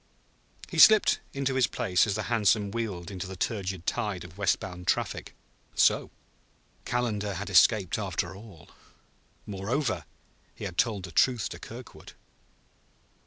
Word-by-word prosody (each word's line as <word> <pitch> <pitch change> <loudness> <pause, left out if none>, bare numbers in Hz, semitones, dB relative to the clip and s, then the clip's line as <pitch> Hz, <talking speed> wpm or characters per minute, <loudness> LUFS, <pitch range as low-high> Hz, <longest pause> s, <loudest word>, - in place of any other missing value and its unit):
He - - -3
slipped 215 -1 +7
into 135 -1 -1
his 130 -2 +3
place 90 +2 +1
as 100 - -1
the - - -2
hansom 105 -3 +2
wheeled 100 -7 -4
into 95 0 -5
the 95 - -7
turgid 95 -3 -3
tide 100 -4 -2
of 90 -1 -12
west 100 -2 +1
bound 90 -1 -8
traffic. - - -1 0.4
So - - +3 0.8
Calendar 105 -5 -1
had 100 +2 -5
escaped, 95 0 +4
after 95 -2 -3
all! 100 -5 -14 0.7
Moreover, 105 - -2 0.5
he - - -10
had 90 -3 -5
told 105 -5 +1
the 90 - -7
truth 120 +6 +2
to - - -8
Kirkwood. - - -11
100 Hz, 140 wpm, -28 LUFS, 95-115 Hz, 0.8 s, slipped